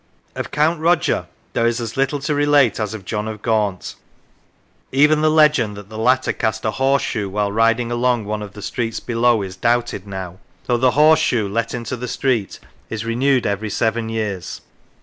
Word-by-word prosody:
Of -, -, -5 dB
Count 155 Hz, +3 st, +1 dB
Roger 165 Hz, +1 st, +1 dB, 0.3 s
there 115 Hz, -, +2 dB
is 120 Hz, +1 st, 0 dB
as 115 Hz, -1 st, -5 dB
little 135 Hz, +2 st, 0 dB
to 145 Hz, +2 st, -1 dB
relate 145 Hz, -4 st, +3 dB
as 110 Hz, 0 st, -2 dB
of 100 Hz, -4 st, -10 dB
John 105 Hz, +1 st, -3 dB
of 110 Hz, -1 st, -7 dB
Gaunt: 105 Hz, -5 st, -1 dB, 1.0 s
even 150 Hz, +3 st, +4 dB
the 155 Hz, -, +4 dB
legend 150 Hz, -9 st, +3 dB
that 105 Hz, 0 st, -11 dB
the 110 Hz, -, -8 dB
latter 125 Hz, +3 st, +2 dB
cast 110 Hz, -2 st, -2 dB
a 110 Hz, -, +1 dB
horseshoe 135 Hz, -6 st, 0 dB
while 100 Hz, +1 st, -1 dB
riding 115 Hz, +2 st, +2 dB
along 120 Hz, -2 st, +1 dB
one 105 Hz, +1 st, -3 dB
of 105 Hz, -2 st, -8 dB
the 105 Hz, -, -10 dB
streets 115 Hz, -2 st, -3 dB
below 120 Hz, -2 st, +1 dB
is 95 Hz, -2 st, -7 dB
doubted 115 Hz, -1 st, -1 dB
now, 95 Hz, -2 st, -7 dB, 0.3 s
though 120 Hz, -, +1 dB
the 130 Hz, +1 st, +3 dB
horse 155 Hz, +1 st, +6 dB
shoe 120 Hz, -9 st, +1 dB
let 115 Hz, +4 st, -2 dB
into 120 Hz, +1 st, -4 dB
the 125 Hz, 0 st, -6 dB
street 120 Hz, -8 st, -1 dB, 0.3 s
is 115 Hz, 0 st, -4 dB
renewed 125 Hz, +3 st, +1 dB
every 100 Hz, +1 st, -2 dB
seven 110 Hz, +2 st, -1 dB
years. 105 Hz, -6 st, -4 dB
115 Hz, 190 wpm, -20 LUFS, 105-130 Hz, 1.0 s, horse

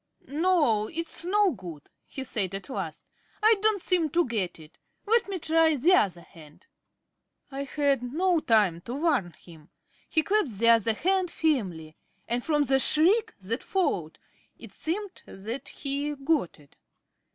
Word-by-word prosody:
"No, 295 Hz, -, +2 dB
it's 335 Hz, +3 st, -4 dB
no 405 Hz, +1 st, +3 dB
good," 175 Hz, -, -10 dB, 0.2 s
he 265 Hz, -, -6 dB
said 195 Hz, -7 st, -2 dB
at 195 Hz, -1 st, -7 dB
last. 170 Hz, -6 st, -5 dB, 0.4 s
"I 440 Hz, 0 st, +6 dB
don't 425 Hz, -3 st, +2 dB
seem 345 Hz, -4 st, +2 dB
to 345 Hz, +4 st, +2 dB
get 210 Hz, -8 st, -3 dB
it. 155 Hz, 0 st, -16 dB, 0.3 s
Let 450 Hz, 0 st, +2 dB
me 390 Hz, -, -2 dB
try 320 Hz, -1 st, +3 dB
the 310 Hz, +8 st, +3 dB
other 190 Hz, -, +2 dB
hand." 155 Hz, -3 st, -17 dB, 0.9 s
I 275 Hz, +1 st, -4 dB
had 280 Hz, -1 st, 0 dB
no 355 Hz, +3 st, +2 dB
time 210 Hz, -, +2 dB
to 245 Hz, -, -5 dB
warn 280 Hz, -, 0 dB
him. 160 Hz, -1 st, -17 dB, 0.4 s
He 315 Hz, -, +2 dB
clasped 385 Hz, -, 0 dB
the 230 Hz, +3 st, +3 dB
other 230 Hz, -1 st, +4 dB
hand 375 Hz, -, +1 dB
firmly; 185 Hz, -, -2 dB, 0.3 s
and 240 Hz, +1 st, -1 dB
from 300 Hz, -2 st, +2 dB
the 270 Hz, -1 st, +2 dB
shriek 355 Hz, -, +3 dB
that 225 Hz, +7 st, -3 dB
followed 190 Hz, -, -1 dB, 0.4 s
it -, -, -12 dB
seemed 380 Hz, +4 st, -5 dB
that 220 Hz, +7 st, -7 dB
he 285 Hz, +1 st, -3 dB
got 275 Hz, -, -1 dB
it. 145 Hz, -1 st, -22 dB
275 Hz, 155 wpm, -27 LUFS, -, 0.9 s, I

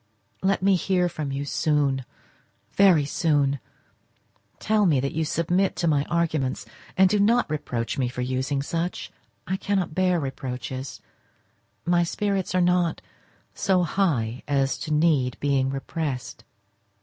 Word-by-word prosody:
Let 190 Hz, 0 st, +1 dB
me 195 Hz, 0 st, +5 dB
hear 180 Hz, 0 st, +1 dB
from 155 Hz, -4 st, -4 dB
you 140 Hz, +1 st, -3 dB
soon—very 150 Hz, +4 st, 0 dB
soon. 140 Hz, -2 st, +1 dB, 1.0 s
Tell 210 Hz, -1 st, +2 dB
me 150 Hz, -6 st, +3 dB
that 140 Hz, +1 st, -1 dB
you 160 Hz, -, -1 dB
submit 175 Hz, +5 st, 0 dB
to 170 Hz, -, -1 dB
my 145 Hz, -2 st, +2 dB
arguments, 160 Hz, -6 st, -1 dB, 0.3 s
and 190 Hz, 0 st, +6 dB
do 210 Hz, +2 st, +1 dB
not 230 Hz, +4 st, +3 dB
reproach 125 Hz, -4 st, -3 dB
me 125 Hz, -2 st, +1 dB
for 125 Hz, -, -5 dB
using 130 Hz, +2 st, -1 dB
such. 170 Hz, +4 st, -3 dB, 0.3 s
I 190 Hz, -, -1 dB
cannot 195 Hz, -5 st, -1 dB
bear 185 Hz, 0 st, +2 dB
reproaches: 130 Hz, -2 st, -5 dB, 0.8 s
my 175 Hz, 0 st, +3 dB
spirits 195 Hz, +1 st, -1 dB
are 185 Hz, -, +3 dB
not 175 Hz, -1 st, +2 dB, 0.5 s
so 185 Hz, -2 st, +2 dB
high 145 Hz, -, 0 dB
as 135 Hz, -2 st, +1 dB
to 155 Hz, -, -5 dB
need 150 Hz, -5 st, +2 dB
being 135 Hz, -2 st, +1 dB
repressed. 135 Hz, -3 st, -4 dB
155 Hz, 135 wpm, -25 LUFS, 135-180 Hz, 1.0 s, and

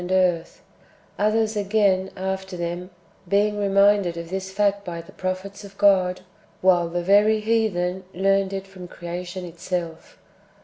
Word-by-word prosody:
143 180 Hz, -1 st, +3 dB
earth; 165 Hz, -, -19 dB, 0.6 s
others, 215 Hz, +1 st, +2 dB
again, 200 Hz, -2 st, +2 dB
after 190 Hz, 0 st, -4 dB
them, 175 Hz, +1 st, -4 dB, 0.4 s
being 205 Hz, +2 st, +2 dB
reminded 200 Hz, -3 st, +3 dB
of 170 Hz, 0 st, -7 dB
this 190 Hz, 0 st, -3 dB
fact 200 Hz, 0 st, +1 dB
by 170 Hz, -3 st, -5 dB
the 165 Hz, -, -11 dB
prophets 185 Hz, +2 st, -5 dB
of 200 Hz, -1 st, -13 dB
God, 185 Hz, -3 st, +3 dB, 0.4 s
Avhile 175 Hz, -2 st, +4 dB
the 175 Hz, 0 st, -2 dB
very 205 Hz, +3 st, +4 dB
heathen 200 Hz, -5 st, 0 dB
learned 195 Hz, +1 st, +1 dB
it 195 Hz, 0 st, -4 dB
from 190 Hz, -2 st, -11 dB
creation 175 Hz, +1 st, -6 dB
itself. 170 Hz, -1 st, -5 dB
190 Hz, 140 wpm, -23 LUFS, 180-200 Hz, 0.6 s, Avhile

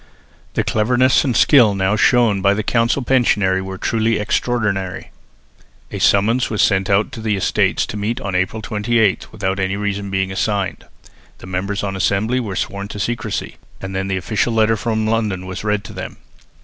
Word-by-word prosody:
The -, -, +1 dB
cleverness 125 Hz, +4 st, +2 dB
and 125 Hz, -5 st, 0 dB
skill 120 Hz, -9 st, +5 dB
now 95 Hz, +2 st, +1 dB
shown 110 Hz, -2 st, +3 dB
by 100 Hz, +1 st, +3 dB
the 110 Hz, -, -2 dB
council 115 Hz, +4 st, +1 dB
pensionary 105 Hz, -7 st, +2 dB
were 95 Hz, 0 st, -6 dB
truly 115 Hz, +1 st, 0 dB
extraordinary. 105 Hz, -4 st, -2 dB, 0.8 s
A -, -, -5 dB
summons 115 Hz, +6 st, +3 dB
was 105 Hz, -, +1 dB
sent 95 Hz, -1 st, +2 dB
out 100 Hz, +2 st, +2 dB
to 115 Hz, -, -8 dB
the 110 Hz, -2 st, 0 dB
Estates 95 Hz, -, +1 dB
to 105 Hz, -, -6 dB
meet 110 Hz, +4 st, -2 dB
on 100 Hz, -, -4 dB
April 95 Hz, +4 st, -1 dB
28 110 Hz, -1 st, 0 dB
without 95 Hz, +1 st, -2 dB
any 95 Hz, 0 st, -1 dB
reason 100 Hz, -1 st, -3 dB
being 95 Hz, 0 st, -1 dB
assigned. 100 Hz, 0 st, -2 dB, 0.5 s
The -, -, -12 dB
members 95 Hz, +2 st, -3 dB
on 100 Hz, -1 st, -3 dB
assembly 100 Hz, +6 st, 0 dB
were 105 Hz, -6 st, -4 dB
sworn 100 Hz, +2 st, -3 dB
to 105 Hz, -, -8 dB
secrecy, 115 Hz, +2 st, -3 dB, 0.2 s
and 95 Hz, 0 st, -6 dB
then 95 Hz, 0 st, -2 dB
the 95 Hz, -1 st, -1 dB
official 110 Hz, +5 st, -1 dB
letter 110 Hz, 0 st, +3 dB
from 110 Hz, 0 st, -1 dB
London 110 Hz, -4 st, -1 dB
was 95 Hz, +1 st, -6 dB
read 105 Hz, -1 st, 0 dB
to -, -, -10 dB
them. -, -, -7 dB
105 Hz, 180 wpm, -19 LUFS, 95-115 Hz, 0.8 s, skill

